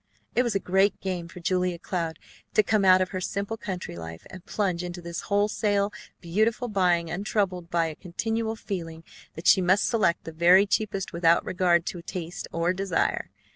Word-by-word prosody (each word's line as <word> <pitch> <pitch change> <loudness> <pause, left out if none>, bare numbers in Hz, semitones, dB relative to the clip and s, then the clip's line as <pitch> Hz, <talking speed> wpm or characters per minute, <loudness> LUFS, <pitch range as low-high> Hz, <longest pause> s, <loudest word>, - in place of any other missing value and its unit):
It 245 - +3
was 240 -5 -1
a - - +3
great 190 +2 +2
game 180 -3 -3
for 175 +1 -11
Julia 180 0 0
Cloud 170 -2 -3 0.4
to 215 - +6
come 210 0 +2
out 185 -1 +6
of 185 - 0
her 185 -1 -4
simple 200 +4 -3
country 190 - -6
life 80 -1 -8
and 185 -2 -10
plunge 185 -4 -1
into 175 0 -5
this 170 0 -5
wholesale 205 0 +1 0.3
beautiful 220 +8 0
buying 175 -5 +2
untroubled 185 -2 -1
by 170 -1 +2
a 160 - -3
continual 225 +6 -2
feeling 165 -7 -6 0.3
that 165 - -8
she 190 - +6
must 185 +2 +3
select 205 -7 +1
the 165 - -7
very 175 +5 +6
cheapest 200 -2 -1
without 170 0 +3
regard 175 -2 +2
to 175 - -5
taste 170 0 -6
or 170 +2 +1
desire. 190 -2 -1
185 Hz, 180 wpm, -26 LUFS, 170-200 Hz, 0.4 s, to